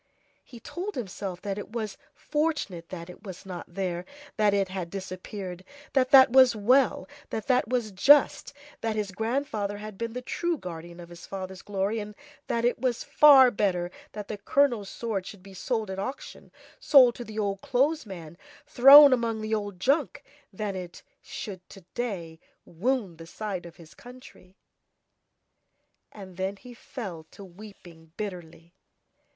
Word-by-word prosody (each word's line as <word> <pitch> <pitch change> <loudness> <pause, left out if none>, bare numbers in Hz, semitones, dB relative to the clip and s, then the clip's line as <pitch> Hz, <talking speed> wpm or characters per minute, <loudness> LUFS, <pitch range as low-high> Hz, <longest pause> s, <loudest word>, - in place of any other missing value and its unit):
He 240 - -13
told 370 - -6
himself 190 -5 -6
that 200 -1 -3
it 205 - -9
was 220 -4 -4 0.2
fortunate 295 - -2
that 170 -2 -7
it 180 - -12
was 190 -3 -9
not 180 -2 -8
there 180 -3 -2
and 180 - -11 0.3
that 210 -1 +4
it 200 -1 +1
had 185 -3 -5
disappeared, 185 0 -7 0.3
that 255 -2 +2
that 265 -2 +8
was 260 -2 +6
well, 230 -1 +2 0.2
that 220 - -4
that 250 -4 +2
was 240 -3 -1
just, 275 +9 +4 0.3
that 225 -1 -2
his 210 -2 -2
grandfather 220 -1 -2
had 210 -1 -9
been 230 -1 -3
the 250 +1 -6
true 345 +5 -2
guardian 170 - -9
of 170 -1 -11
his 170 -1 -12
father's 190 -1 -7
glory, 205 +2 -2
and 210 0 -7 0.3
that 235 0 0
it 245 - +1
was 245 -1 -1
far 270 -4 +7
better 180 -4 -1 0.2
that 210 -1 -7
the 210 - -6
colonel's 235 -3 +1
sword 210 -5 -4
should 200 -3 -11
be 195 0 -13
sold 220 +1 -3
at 190 - -5
auction, 260 +8 -7 0.3
sold 255 -4 +6
to 240 - -8
the 220 -2 -10
old 200 -2 -2
clothes 290 +5 +1
man, 170 -4 -10 0.3
thrown 280 0 +9
among 230 -3 -1
the 215 0 -3
old 205 -4 -3
junk, 275 - 0 0.3
than 205 0 -4
that 190 - -4
it 175 -1 -10 0.2
should, 185 -3 -8
to 195 - -13
day, 180 -10 -4 0.3
wound 195 -1 -2
the 165 - -10
side 190 -2 -5
of 170 - -14
his 165 -3 -15
country. 245 -6 -15 1.5
And 190 -4 -12
then 190 +1 -2
he 245 +5 -13
fell 190 - -8
to 200 - -12
weeping 175 -4 -14
bitterly. 175 -4 -7
205 Hz, 170 wpm, -27 LUFS, 185-245 Hz, 1.5 s, thrown